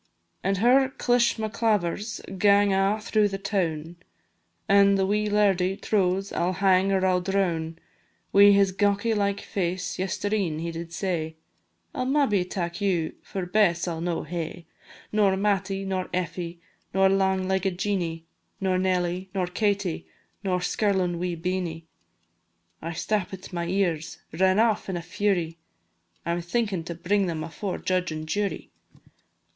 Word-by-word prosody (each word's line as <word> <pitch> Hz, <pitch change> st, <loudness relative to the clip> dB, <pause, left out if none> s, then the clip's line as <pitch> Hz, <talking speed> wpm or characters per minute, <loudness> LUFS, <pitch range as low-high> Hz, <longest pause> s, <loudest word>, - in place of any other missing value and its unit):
An' 195 Hz, -, +1 dB
her 255 Hz, +6 st, +4 dB
clishmaclavers 220 Hz, -5 st, 0 dB, 0.2 s
gang 200 Hz, 0 st, +5 dB
a' 195 Hz, +2 st, +2 dB
through 210 Hz, 0 st, +2 dB
the 195 Hz, -1 st, -4 dB
toun, 175 Hz, -5 st, -2 dB, 0.7 s
An' 200 Hz, 0 st, +5 dB
the 195 Hz, -1 st, +2 dB
wee 210 Hz, +2 st, +1 dB
lairdie 195 Hz, -2 st, +2 dB
trows 195 Hz, -1 st, 0 dB
I -, -, -1 dB
'll 180 Hz, +2 st, +1 dB
hang 190 Hz, +1 st, +3 dB
or 190 Hz, -1 st, +2 dB
I 185 Hz, -, +4 dB
'll 180 Hz, -, +1 dB
droun. 175 Hz, -4 st, -1 dB, 0.6 s
Wi' 200 Hz, +1 st, +8 dB
his 200 Hz, -1 st, +5 dB
gawky 205 Hz, +3 st, +1 dB
like 200 Hz, -1 st, 0 dB
face, 180 Hz, 0 st, -3 dB
yestreen 195 Hz, -3 st, -1 dB
he 170 Hz, +1 st, -3 dB
did 165 Hz, 0 st, -7 dB
say, 170 Hz, -3 st, -2 dB, 0.6 s
"I -, -, -3 dB
'll -, -, 0 dB
maybe 265 Hz, -9 st, +2 dB
tak 175 Hz, 0 st, -4 dB
you, 180 Hz, -5 st, 0 dB
for 190 Hz, -2 st, -5 dB
Bess 180 Hz, -2 st, +2 dB
I 170 Hz, -, -1 dB
'll 160 Hz, -, -5 dB
no 170 Hz, -1 st, -1 dB
hae, 170 Hz, 0 st, -5 dB, 0.5 s
Nor 200 Hz, -3 st, +3 dB
Mattie, 195 Hz, -1 st, 0 dB
nor 190 Hz, -1 st, -2 dB
Effie, 175 Hz, -1 st, -3 dB, 0.4 s
nor 195 Hz, 0 st, +5 dB
lang 190 Hz, -1 st, +2 dB
legged 190 Hz, -1 st, 0 dB
Jeanie, 175 Hz, -5 st, -2 dB, 0.3 s
Nor 185 Hz, -1 st, +1 dB
Nelly, 185 Hz, 0 st, 0 dB
nor 185 Hz, -2 st, +1 dB
Katie, 200 Hz, -1 st, -1 dB, 0.4 s
nor 180 Hz, -2 st, 0 dB
skirlin' 185 Hz, -3 st, 0 dB
wee 180 Hz, -1 st, -2 dB
Beenie." 170 Hz, -1 st, -3 dB, 1.0 s
I 165 Hz, +1 st, -4 dB
stappit 190 Hz, +1 st, -3 dB
my 170 Hz, -1 st, -2 dB
ears, 175 Hz, -4 st, -1 dB, 0.2 s
ran 185 Hz, +3 st, +3 dB
aff 220 Hz, -2 st, +2 dB
in 185 Hz, -, -2 dB
a -, -, -4 dB
fury 175 Hz, -3 st, -1 dB, 0.7 s
I 170 Hz, -, 0 dB
'm 175 Hz, +1 st, -1 dB
thinkin' 195 Hz, -1 st, -1 dB
to 170 Hz, -, -5 dB
bring 195 Hz, +3 st, +1 dB
them 160 Hz, -2 st, -3 dB
afore 180 Hz, +4 st, -4 dB
judge 185 Hz, -2 st, -1 dB
an' 155 Hz, 0 st, -5 dB
jury. 205 Hz, +5 st, -2 dB
190 Hz, 150 wpm, -26 LUFS, 175-200 Hz, 1.0 s, Wi